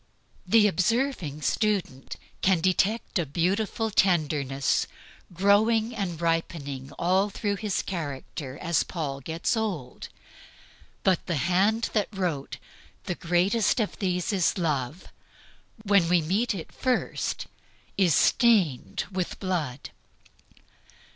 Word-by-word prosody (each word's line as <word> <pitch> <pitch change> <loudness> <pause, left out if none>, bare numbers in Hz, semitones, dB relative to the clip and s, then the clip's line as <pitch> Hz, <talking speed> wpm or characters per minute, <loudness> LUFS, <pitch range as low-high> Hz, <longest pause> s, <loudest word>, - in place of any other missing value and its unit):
The 225 -2 +5
observing 190 - 0
student 195 - -1 0.3
can 190 -2 +3
detect 190 +4 +1
a - - +1
beautiful 200 - 0
tenderness 150 -8 +1 0.4
growing 215 +5 +3
and 175 -6 -3
ripening 150 -5 -2
all 190 +4 +2
through 205 0 -2
his 210 -3 -1
character 145 -5 -5
as 170 -2 +1
Paul 145 -6 -4
gets 160 - -1
old; 185 - -4 0.9
but 185 -3 +2
the 170 - 0
hand 190 +9 +1
that 210 -3 +1
wrote, 175 -9 -3 0.5
"The - - -2
greatest 180 +8 +1
of 215 - -2
these 180 0 -1
is 185 -1 +1
love," 150 -2 -2 0.7
when 200 -5 +3
we 180 0 +5
meet 200 +8 0
it 165 - -7
first, 255 -1 -1 0.5
is 180 -6 +3
stained 190 - +3
with 185 -2 -3
blood. 160 -9 -3
180 Hz, 110 wpm, -26 LUFS, 155-205 Hz, 0.9 s, The